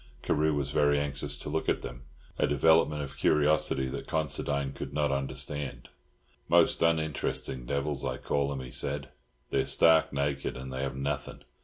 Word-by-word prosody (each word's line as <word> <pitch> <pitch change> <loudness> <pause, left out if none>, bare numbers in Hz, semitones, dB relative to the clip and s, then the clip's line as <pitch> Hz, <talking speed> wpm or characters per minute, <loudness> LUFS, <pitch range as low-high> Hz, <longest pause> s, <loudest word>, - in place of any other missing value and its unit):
Carew 75 0 +2
was 70 -1 -2
very 75 -1 +3
anxious 70 0 -3
to - - -7
look - - -1
at - - 0
them, 60 0 -8 0.3
a - - +3
development 75 +1 +3
of 70 -1 -8
curiosity 75 -2 +2
that - - -6
Considine 70 -2 -1
could 70 - -7
not 75 -2 +2
understand. 70 -1 -3 0.6
"Most - - +4
uninteresting 80 -6 0
devils, 70 +1 -1
I - - -2
call 70 0 0
'em," 70 -2 -4
he 65 - -8
said. 70 -1 -1 0.4
"They're 65 - +2
stark 80 -1 +5
naked, 70 -1 -2
and 65 0 -7
they 65 - -3
have 70 -1 -2
nothing. 70 +1 -4
70 Hz, 165 wpm, -29 LUFS, 70-75 Hz, 0.6 s, stark